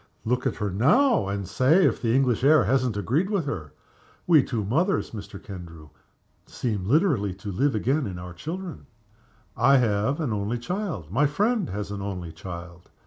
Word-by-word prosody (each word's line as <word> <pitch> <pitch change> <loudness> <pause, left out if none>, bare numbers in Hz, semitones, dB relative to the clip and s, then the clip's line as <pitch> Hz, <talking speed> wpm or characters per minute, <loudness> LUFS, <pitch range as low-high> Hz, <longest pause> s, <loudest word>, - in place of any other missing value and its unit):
Look 125 +2 0
at - - -2
her 105 -3 -2
now, 155 - +3
and 100 -1 -3
say 155 - +4
if - - +1
the 115 0 +1
English 130 -3 +2
air 150 -1 +6
hasn't 125 0 +1
agreed 145 - 0
with 200 -7 0
her! 80 - -5 0.5
We 160 -4 +6
two 115 -5 -3
mothers, 170 - 0
Mr. 100 -3 -8
Kendrew, 85 -6 -10 0.6
seem 105 -6 -3
literally 130 - +2
to 100 +2 -7
live 135 +7 +1
again 130 +5 0
in 95 -2 -6
our 90 0 -8
children. 170 - -7 0.7
I 140 0 +5
have 115 +3 +1
an 140 -9 -1
only 105 +3 -2
child. 175 - -4
My 140 +8 +3
friend 210 - 0
has 100 0 -4
an 100 -1 -5
only 90 -4 -5
child. 85 +1 -9
115 Hz, 175 wpm, -25 LUFS, 100-150 Hz, 0.7 s, air